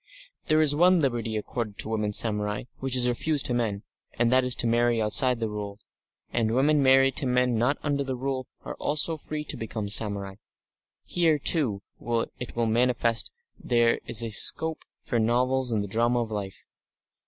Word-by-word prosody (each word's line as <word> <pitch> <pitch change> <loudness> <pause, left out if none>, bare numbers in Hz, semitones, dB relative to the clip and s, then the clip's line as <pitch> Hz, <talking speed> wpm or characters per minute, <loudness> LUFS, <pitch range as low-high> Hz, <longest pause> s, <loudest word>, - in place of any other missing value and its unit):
There 155 -1 +3
is 145 -2 +4
one 180 +4 +4
liberty 120 -6 -1
accorded 110 -1 -5
to - - -5
women 105 -2 -1
samurai 105 -1 +2 0.2
which 130 -1 -1
is 125 -1 +2
refused 145 +4 0
to 130 - +2
men, 110 -4 -2 0.3
and 120 0 +1
that 130 0 +4
is 125 -1 +2
to - - +1
marry 120 0 +2
outside 120 +3 +2
the 115 - -2
Rule, 105 -1 -6 0.6
and 115 -1 0
women 145 +3 +3
married 135 0 +4
to 140 - +1
men 125 -1 +1
not 125 +5 +1
under 140 -1 -1
the 135 -1 -4
Rule 130 0 -4 0.2
are - - -5
also 155 +2 +1
free 150 0 -6
to - - -3
become 110 -2 -5
samurai. 100 -2 -1 0.7
Here, 165 -3 +1
too, 135 - +1 0.6
it 125 - -7
will 120 0 0
be 110 - -1
manifest 120 -1 +1 0.3
there 120 -1 +1
is 115 -2 +1
scope 160 0 -1 0.2
for 120 - -2
novels 125 +3 +1
and 105 -2 0
the - - -6
drama 120 +4 0
of 115 -1 -5
life. 100 -3 -6
120 Hz, 180 wpm, -26 LUFS, 110-135 Hz, 0.7 s, is